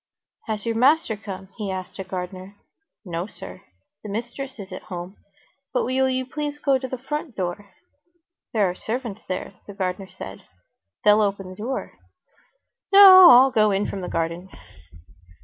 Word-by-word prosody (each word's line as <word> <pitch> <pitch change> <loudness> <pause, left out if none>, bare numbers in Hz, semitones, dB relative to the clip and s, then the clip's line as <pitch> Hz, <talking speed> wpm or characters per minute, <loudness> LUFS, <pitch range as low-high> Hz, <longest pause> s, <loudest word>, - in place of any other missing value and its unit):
"Has 215 -1 -4
your 230 - 0
master 260 +1 +3
come?" 195 -2 -9
he 205 -2 -3
asked 185 0 -6
a - - -3
gardener. 185 +1 -7 0.5
"No, 170 +1 -4
sir. 90 - -11 0.4
The 210 - -8
mistress 240 +5 -5
is 195 -2 -9
at 185 - -7
home. 180 +2 -7 0.6
But - - +2
will 260 +1 +1
you 260 0 -1
please 295 +2 -4
go 275 -2 +1
to 260 - -5
the 260 - -5
front 290 +1 -5
door; 190 +2 -4 0.8
there 210 -4 +2
are 180 - -2
servants 220 +1 -5
there," 185 +1 -4
the 205 - -10
gardener 190 0 -3
answered. 95 - -10 0.6
"They'll 210 +1 +6
open 195 -2 -1
the - - -10
door." 240 +7 -5 0.9
"No, 380 -2 +10
I'll 260 0 +8
go 215 -2 +3
in 200 +1 0
from 195 - -5
the 180 - -5
garden." 170 +3 -3
205 Hz, 165 wpm, -23 LUFS, 185-260 Hz, 0.9 s, No